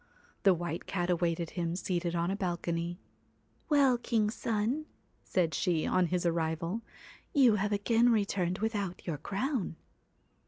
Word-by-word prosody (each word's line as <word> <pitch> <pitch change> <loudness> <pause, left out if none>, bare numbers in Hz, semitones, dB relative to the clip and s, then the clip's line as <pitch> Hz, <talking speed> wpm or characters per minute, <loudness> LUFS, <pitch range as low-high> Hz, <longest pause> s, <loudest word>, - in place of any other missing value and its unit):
The 195 -2 +5
White 170 0 -4
Cat 180 -1 0
awaited 170 -1 0
him 170 -1 -2
seated 175 -2 -1
on 170 +2 0
a - - 0
balcony. 175 -2 -2 0.7
'Well, 275 -4 +4
king's 220 -3 +1
son,' 235 +9 -1 0.4
said 170 -4 0
she, 170 -3 +1
on 185 -1 +2
his 180 0 -1
arrival, 165 +4 -1 0.5
'you 250 -7 +6
have 205 +1 0
again 225 +4 +3
returned 195 -4 +1
without 205 -4 -2
your 155 -5 -3
crown.' 210 - -2
185 Hz, 135 wpm, -31 LUFS, 170-215 Hz, 0.7 s, you